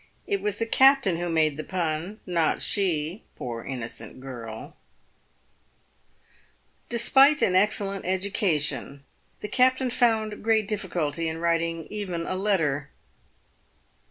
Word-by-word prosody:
It 400 Hz, -2 st, -2 dB
was 210 Hz, -1 st, -1 dB
the 230 Hz, -, -1 dB
captain 265 Hz, -6 st, +4 dB
who 175 Hz, 0 st, -3 dB
made 155 Hz, -3 st, +1 dB
the 155 Hz, -, -4 dB
pun, 175 Hz, +3 st, -3 dB
not 170 Hz, -3 st, 0 dB
she, 175 Hz, -1 st, +1 dB
poor 115 Hz, -2 st, -6 dB
innocent 115 Hz, -3 st, -7 dB
girl! 120 Hz, -4 st, -9 dB, 2.1 s
Despite 270 Hz, +5 st, +5 dB
an 185 Hz, -, +3 dB
excellent 195 Hz, 0 st, +1 dB
education, 185 Hz, -7 st, -1 dB, 0.4 s
the -, -, -4 dB
captain 255 Hz, +3 st, +2 dB
found 220 Hz, -4 st, +1 dB
great 220 Hz, -2 st, +2 dB
difficulty 170 Hz, -6 st, -2 dB
in 160 Hz, -, -5 dB
writing 165 Hz, -1 st, -1 dB
even 185 Hz, -5 st, -3 dB
a -, -, -3 dB
letter. 160 Hz, -8 st, 0 dB
185 Hz, 115 wpm, -25 LUFS, 155-215 Hz, 2.1 s, Despite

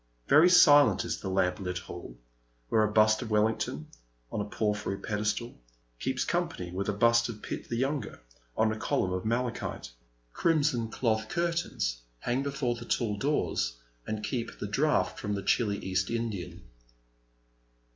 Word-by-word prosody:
Very 155 Hz, +5 st, +7 dB
silent 145 Hz, -, +6 dB
is -, -, -3 dB
the 95 Hz, -, -4 dB
lamplit 90 Hz, -1 st, 0 dB
hall, 85 Hz, -9 st, -9 dB, 0.5 s
where 110 Hz, -, +3 dB
a 105 Hz, 0 st, +2 dB
bust 110 Hz, 0 st, +4 dB
of 120 Hz, -, -5 dB
Welhngton, 105 Hz, -8 st, 0 dB, 0.5 s
on 105 Hz, -, -2 dB
a -, -, -2 dB
porphyry 105 Hz, -2 st, -1 dB
pedestal, 105 Hz, -, -3 dB, 0.4 s
keeps 130 Hz, 0 st, -1 dB
com 175 Hz, 0 st, 0 dB
pany 90 Hz, -, -7 dB
with 100 Hz, +2 st, -2 dB
a -, -, +3 dB
bust 115 Hz, +3 st, +3 dB
of 105 Hz, -2 st, -8 dB
Pitt -, -, -6 dB
the 120 Hz, -, -2 dB
younger, 135 Hz, -1 st, -2 dB, 0.4 s
on 110 Hz, 0 st, +3 dB
a 110 Hz, -, -4 dB
column 90 Hz, -3 st, 0 dB
of 90 Hz, +2 st, -3 dB
malachite. 115 Hz, -, -2 dB, 0.4 s
Crimson 145 Hz, -8 st, +1 dB
cloth 110 Hz, -2 st, 0 dB
curtains 170 Hz, -, -1 dB, 0.2 s
hang 120 Hz, +2 st, 0 dB
before 135 Hz, -3 st, -1 dB
the 120 Hz, 0 st, -8 dB
tall 110 Hz, -4 st, 0 dB
doors, 100 Hz, -, -1 dB, 0.3 s
and 110 Hz, -1 st, -3 dB
keep 120 Hz, -3 st, -3 dB
the -, -, -4 dB
draught 100 Hz, -4 st, +1 dB
from 105 Hz, -1 st, -2 dB
the 100 Hz, -, -4 dB
chilly 105 Hz, -4 st, +1 dB
East 95 Hz, 0 st, -1 dB
Indian. 100 Hz, -7 st, -4 dB
110 Hz, 155 wpm, -29 LUFS, 100-125 Hz, 0.5 s, Very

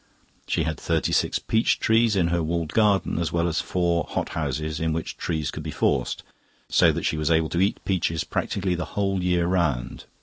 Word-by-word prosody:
She -, -, 0 dB
had 80 Hz, 0 st, -3 dB
thirty 80 Hz, -2 st, 0 dB
six -, -, +2 dB
peach 110 Hz, +1 st, +1 dB
trees 110 Hz, -1 st, +3 dB
in 85 Hz, -3 st, +2 dB
her 85 Hz, 0 st, +1 dB
walled 80 Hz, 0 st, -2 dB
garden, 105 Hz, -5 st, +2 dB
as 85 Hz, -3 st, -1 dB
well 85 Hz, 0 st, +1 dB
as 80 Hz, -2 st, 0 dB
four 85 Hz, 0 st, 0 dB
hot -, -, -2 dB
houses 80 Hz, 0 st, -3 dB
in 80 Hz, -1 st, 0 dB
which 80 Hz, 0 st, -4 dB
trees 80 Hz, -4 st, -2 dB
could -, -, -6 dB
be -, -, -6 dB
forced, -, -, 0 dB, 0.5 s
so -, -, +5 dB
that -, -, -3 dB
she 80 Hz, -, 0 dB
was 75 Hz, 0 st, 0 dB
able 80 Hz, -1 st, +2 dB
to 85 Hz, -, 0 dB
eat 100 Hz, +2 st, +1 dB
peaches 85 Hz, -4 st, 0 dB
practically 95 Hz, -2 st, -2 dB
the 90 Hz, 0 st, -2 dB
whole 95 Hz, -2 st, +1 dB
year 90 Hz, -1 st, +2 dB
round. 85 Hz, -9 st, -1 dB
85 Hz, 205 wpm, -24 LUFS, 80-95 Hz, 0.5 s, so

